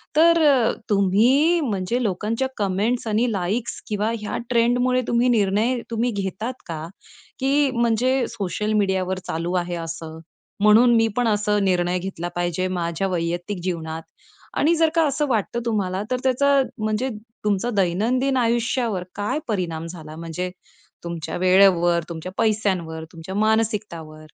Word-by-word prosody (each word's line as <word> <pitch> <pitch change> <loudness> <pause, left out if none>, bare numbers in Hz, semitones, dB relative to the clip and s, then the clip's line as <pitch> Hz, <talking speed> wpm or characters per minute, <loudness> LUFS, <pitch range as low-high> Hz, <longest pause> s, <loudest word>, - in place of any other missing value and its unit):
तर 335 +2 +6
अ, 255 -5 +4 0.2
तुम्ही 235 - +4
म्हणजे 225 0 -1
लोकांच्या 220 +6 -1
कमेंट्स 210 +5 0
आणि 225 +3 +1
लाइक्स 205 +5 -2
किंवा 210 +1 -1
ह्या 210 - -4
ट्रेंडमुळे, 245 +2 +2
तुम्ही 240 +1 +2
निर्णय 220 +3 +2
तुम्ही 235 +2 0
घेतात 200 +4 -3
का? 160 -1 -5 0.5
की 275 +1 +2
म्हणजे 240 +2 +1
सोशल 210 +2 -2
मीडियावर 190 -2 0
चालू 170 +2 -2
आहे 175 0 -4
असं 165 -1 -6 0.4
म्हणून 230 +3 +6
मी 225 0 +4
पण 245 -2 +1
असं 210 -1 +1
निर्णय 180 -1 +1
घेतला 175 -2 -5
पाहिजे 175 +1 -1
माझ्या 175 +1 -2
वैयक्तिक 175 +2 -2
जीवनात 165 -3 -3 0.6
आणि 330 +3 +3
जर 325 -1 +3
का 330 - +4
असं 295 +2 0
वाटतं 235 -1 -1
तुम्हाला 195 -4 -1
तर 255 - +2
त्याचा 275 +2 +3 0.2
म्हणजे 215 +4 -1 0.4
तुमचा 210 +3 +1
दैनंदिन 230 +9 +1
आयुष्यावर 235 -4 0
काय 210 +9 -1
परिणाम 170 -6 -2
झाला, 160 -3 -9
म्हणजे 165 +2 -4 0.5
तुमच्या 170 -2 -5
वेळेवर, 180 -2 +4
तुमच्या 170 +2 -6
पैश्यांवर, 190 -7 0
तुमच्या 165 +4 -8
मानसिकतावर? 210 -8 -1
205 Hz, 135 wpm, -23 LUFS, 180-240 Hz, 0.6 s, तर